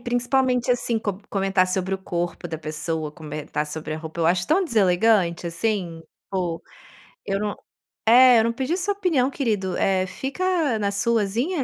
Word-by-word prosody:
principalmente, 245 Hz, +1 st, +1 dB
assim, 240 Hz, -2 st, +1 dB
com 205 Hz, -3 st, -3 dB
comentar 195 Hz, -1 st, +2 dB
sobre 185 Hz, +1 st, -1 dB
o 190 Hz, -, -4 dB
corpo 175 Hz, -2 st, -4 dB
da 160 Hz, -, -5 dB
pessoa, 155 Hz, 0 st, -4 dB
comentar 150 Hz, -2 st, -5 dB
sobre 155 Hz, +1 st, -5 dB
a 155 Hz, -, -5 dB
roupa, 160 Hz, +1 st, -7 dB
eu 165 Hz, -, +3 dB
acho 180 Hz, +2 st, +2 dB
tão 375 Hz, +5 st, +3 dB
deselegante, 190 Hz, -, +2 dB
assim. 170 Hz, -2 st, -2 dB, 0.3 s
Pô! 175 Hz, -3 st, -2 dB, 0.6 s
Eu 195 Hz, 0 st, -1 dB
não 210 Hz, 0 st, -2 dB, 0.5 s
é, 245 Hz, +1 st, +7 dB
"eu 220 Hz, -, +3 dB
não 230 Hz, -, 0 dB
pedi 265 Hz, +8 st, -1 dB
sua 395 Hz, +2 st, 0 dB
opinião 330 Hz, -10 st, +1 dB
querido, 210 Hz, -10 st, -1 dB
eh 190 Hz, -1 st, +2 dB
fica 295 Hz, -, -1 dB
na 200 Hz, -1 st, 0 dB
suazinha". 235 Hz, -, 0 dB
200 Hz, 165 wpm, -23 LUFS, 175-245 Hz, 0.6 s, é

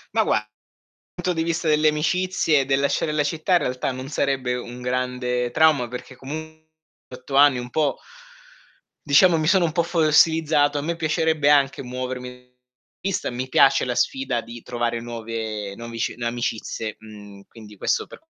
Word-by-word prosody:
Ma -, -, +4 dB
gua 105 Hz, -, +1 dB, 0.7 s
punto 180 Hz, 0 st, -1 dB
di 165 Hz, -, -1 dB
vista 170 Hz, 0 st, -2 dB
delle 155 Hz, 0 st, +3 dB
amicizie 155 Hz, +1 st, +1 dB
e 135 Hz, -, 0 dB
del 135 Hz, 0 st, +1 dB
lasciare 140 Hz, +2 st, 0 dB
la 150 Hz, -1 st, +1 dB
città, 160 Hz, +5 st, -1 dB
in -, -, +7 dB
realtà, 125 Hz, +1 st, -2 dB
non 130 Hz, +1 st, -7 dB
sarebbe 135 Hz, -3 st, -1 dB
un 125 Hz, 0 st, -7 dB
grande 125 Hz, -1 st, -1 dB
trauma, 150 Hz, -3 st, +3 dB
perché 125 Hz, +2 st, -9 dB
comu 160 Hz, +4 st, -8 dB, 0.5 s
8 130 Hz, +2 st, -7 dB
anni 140 Hz, -2 st, +6 dB
un 125 Hz, 0 st, -6 dB
po' 150 Hz, -3 st, +1 dB, 1.1 s
diciamo, 165 Hz, +4 st, +5 dB
mi 155 Hz, -1 st, -1 dB
sono 185 Hz, 0 st, +4 dB
un 160 Hz, -, -1 dB
po' 170 Hz, +2 st, +1 dB
fossilizzato. 155 Hz, -2 st, +3 dB
A -, -, -1 dB
me 170 Hz, +3 st, -2 dB
piacerebbe 160 Hz, -2 st, +1 dB
anche 140 Hz, -2 st, +3 dB
muovermi 125 Hz, 0 st, -6 dB, 0.5 s
vista, 190 Hz, -1 st, -2 dB
mi 125 Hz, +2 st, -4 dB
piace 135 Hz, +1 st, +4 dB
la 125 Hz, -1 st, -2 dB
sfida 130 Hz, -2 st, 0 dB
di 115 Hz, 0 st, -10 dB
trovare 120 Hz, -1 st, -2 dB
nuove 110 Hz, -3 st, -5 dB
novici 115 Hz, 0 st, -4 dB
amicizie, 115 Hz, -2 st, -3 dB
mhmm, 105 Hz, -2 st, -13 dB
quindi 105 Hz, -2 st, -14 dB
questo -, -, 0 dB
per -, -, -13 dB
135 Hz, 165 wpm, -23 LUFS, 120-155 Hz, 1.1 s, in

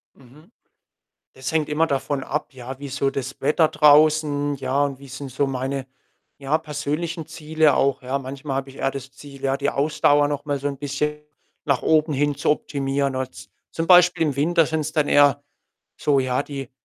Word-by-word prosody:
Mhm. 145 Hz, -, -19 dB, 0.8 s
Das 130 Hz, 0 st, -5 dB
hängt 155 Hz, -2 st, 0 dB
immer 155 Hz, +2 st, +2 dB
davon 140 Hz, -1 st, -2 dB
ab, 150 Hz, -1 st, -4 dB
ja? 130 Hz, +1 st, -8 dB
Wie 145 Hz, -, -7 dB
ist 140 Hz, +1 st, -6 dB
so 140 Hz, -1 st, +1 dB
das 135 Hz, 0 st, -5 dB
Wetter 155 Hz, +3 st, +3 dB
draußen, 150 Hz, -1 st, +4 dB
ja, 135 Hz, +1 st, 0 dB
und 140 Hz, -2 st, -4 dB
wie 140 Hz, -, -12 dB
sind 135 Hz, +1 st, -7 dB
so 140 Hz, +2 st, 0 dB
meine, 135 Hz, 0 st, -3 dB, 0.5 s
ja, 140 Hz, +2 st, +1 dB
persönlichen 160 Hz, +2 st, -4 dB
Ziele 155 Hz, -2 st, +1 dB
auch, 140 Hz, -1 st, +1 dB
ja? 130 Hz, +2 st, -2 dB
Manchmal 135 Hz, +1 st, -5 dB
habe 135 Hz, 0 st, -4 dB
ich 135 Hz, -, -15 dB
eher 135 Hz, -, 0 dB
das 135 Hz, -1 st, -8 dB
Ziel, 140 Hz, 0 st, -13 dB
ja, 135 Hz, 0 st, +1 dB
die 140 Hz, 0 st, -1 dB
Ausdauer 145 Hz, 0 st, +2 dB
noch 145 Hz, 0 st, -3 dB
mal 145 Hz, -2 st, -1 dB
so 140 Hz, -, -2 dB
'n 140 Hz, -2 st, -6 dB
bisschen 150 Hz, +1 st, -2 dB, 0.4 s
nach 140 Hz, -4 st, +1 dB
oben 155 Hz, 0 st, +2 dB
hin 145 Hz, +1 st, +1 dB
zu 150 Hz, +2 st, +1 dB
optimieren, 140 Hz, -2 st, -1 dB
also 130 Hz, 0 st, -6 dB, 0.2 s
zum 165 Hz, -, -3 dB
Beispiel 180 Hz, -1 st, +6 dB
im 145 Hz, -4 st, 0 dB
Winter 165 Hz, +3 st, +3 dB
sind's 155 Hz, 0 st, -2 dB
dann 150 Hz, -2 st, +1 dB
eher 145 Hz, 0 st, +4 dB, 0.5 s
so, 145 Hz, -2 st, +2 dB
ja, 130 Hz, 0 st, 0 dB
die 140 Hz, -3 st, -7 dB
145 Hz, 190 wpm, -22 LUFS, 135-150 Hz, 0.8 s, Beispiel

